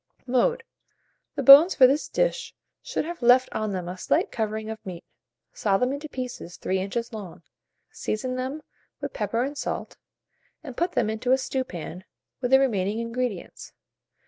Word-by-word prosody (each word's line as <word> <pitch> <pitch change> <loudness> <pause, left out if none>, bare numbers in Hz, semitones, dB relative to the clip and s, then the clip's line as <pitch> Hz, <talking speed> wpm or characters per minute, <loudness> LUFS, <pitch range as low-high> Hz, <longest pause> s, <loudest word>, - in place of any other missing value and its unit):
Mode. 465 - +1 0.7
The - - -2
bones 290 +6 +9
for 260 - +8
this 280 +4 +2
dish - - -1 0.3
should - - -3
have 340 -1 -6
left 245 +2 +5
on 215 -1 -2
them 180 -2 -4
a 180 +1 -6
slight - - +1
covering 220 -1 -3
of 220 - -8
meat; 180 -4 -8 0.5
saw 195 -2 +1
them 250 +5 0
into 295 +2 -6
pieces 250 - -6
3 190 0 -1
inches 230 +5 -3
long; 200 -6 -8 0.5
season 255 +4 -3
them 265 +4 -4 0.4
with - - -5
pepper 240 - -1
and 280 +3 -4
salt, - - -4 0.7
and 265 -6 -8
put 345 +4 -1
them - - +1
into 220 +4 0
a - - +5
stewpan 185 - -5 0.4
with 245 - -1
the 265 +1 +6
remaining 210 -6 0
ingredients. 230 -4 -4
245 Hz, 165 wpm, -25 LUFS, 210-270 Hz, 0.7 s, bones